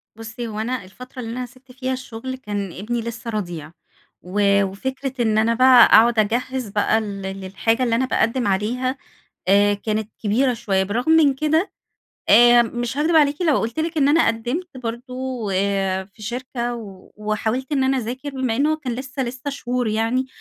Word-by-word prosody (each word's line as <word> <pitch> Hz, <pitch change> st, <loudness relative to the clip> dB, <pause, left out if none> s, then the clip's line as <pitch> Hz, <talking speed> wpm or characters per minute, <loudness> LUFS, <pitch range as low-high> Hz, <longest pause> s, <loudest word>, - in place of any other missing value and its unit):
بصي 225 Hz, +1 st, -7 dB
هو 215 Hz, -1 st, -5 dB
أنا 245 Hz, 0 st, -2 dB
الفترة 250 Hz, +7 st, -12 dB
اللي 225 Hz, -1 st, -5 dB
أنا 250 Hz, +1 st, -4 dB
سِبت 255 Hz, +1 st, -18 dB
فيها 260 Hz, 0 st, -3 dB
الشغل 255 Hz, 0 st, -6 dB
كان 205 Hz, -7 st, -4 dB
ابني 230 Hz, +5 st, -3 dB
لسه 235 Hz, +1 st, -6 dB
رضيع، 175 Hz, -8 st, -4 dB, 0.5 s
و 200 Hz, +2 st, +2 dB
وفكرة 260 Hz, +6 st, -4 dB
إن 215 Hz, -1 st, +1 dB
أنا 225 Hz, +1 st, +3 dB
بقى 255 Hz, 0 st, +7 dB
أقعد 230 Hz, 0 st, +5 dB
أجهِّز 240 Hz, +2 st, -1 dB
بقى 210 Hz, +2 st, +1 dB
ل 200 Hz, -2 st, -6 dB
للحاجة 195 Hz, +5 st, -1 dB
اللي 230 Hz, -2 st, +1 dB
أنا 260 Hz, +2 st, +1 dB
باقدِّم 240 Hz, -1 st, 0 dB
عليها، 245 Hz, +7 st, -1 dB, 0.5 s
آآ، 205 Hz, +1 st, +5 dB
كانت 215 Hz, +1 st, -3 dB
كبيرة 245 Hz, +5 st, +2 dB
شوية، 195 Hz, -4 st, 0 dB
بالرغم 240 Hz, +10 st, 0 dB
من 305 Hz, -4 st, +5 dB
كده 310 Hz, +6 st, 0 dB, 0.6 s
آآ، 240 Hz, 0 st, +7 dB
مش 240 Hz, +2 st, -4 dB
هاكدب 320 Hz, +2 st, +2 dB
عليكِ 290 Hz, +2 st, +3 dB
لو 310 Hz, -5 st, +3 dB
قلت 230 Hz, +7 st, -2 dB
لِك 325 Hz, 0 st, -3 dB
إن 280 Hz, 0 st, +4 dB
أنا 325 Hz, +3 st, +4 dB
قدِّمت 255 Hz, +9 st, -2 dB
برضه، 250 Hz, -1 st, -5 dB
آآ، 195 Hz, 0 st, 0 dB
في 200 Hz, +3 st, -18 dB
شركة 240 Hz, +1 st, -4 dB, 0.4 s
وحاولت 220 Hz, +5 st, -2 dB
إن 270 Hz, -2 st, +2 dB
أنا 265 Hz, 0 st, +2 dB
اذاكر 255 Hz, +5 st, -5 dB
بما 260 Hz, -4 st, -2 dB
إن 280 Hz, -, +2 dB
هو 310 Hz, 0 st, +1 dB
كان 260 Hz, -6 st, -4 dB
لسه 265 Hz, +2 st, -4 dB
لسه 255 Hz, +3 st, -4 dB
شهور 250 Hz, -3 st, -2 dB
يعني، 225 Hz, +4 st, 0 dB
240 Hz, 175 wpm, -21 LUFS, 215-260 Hz, 0.6 s, بقى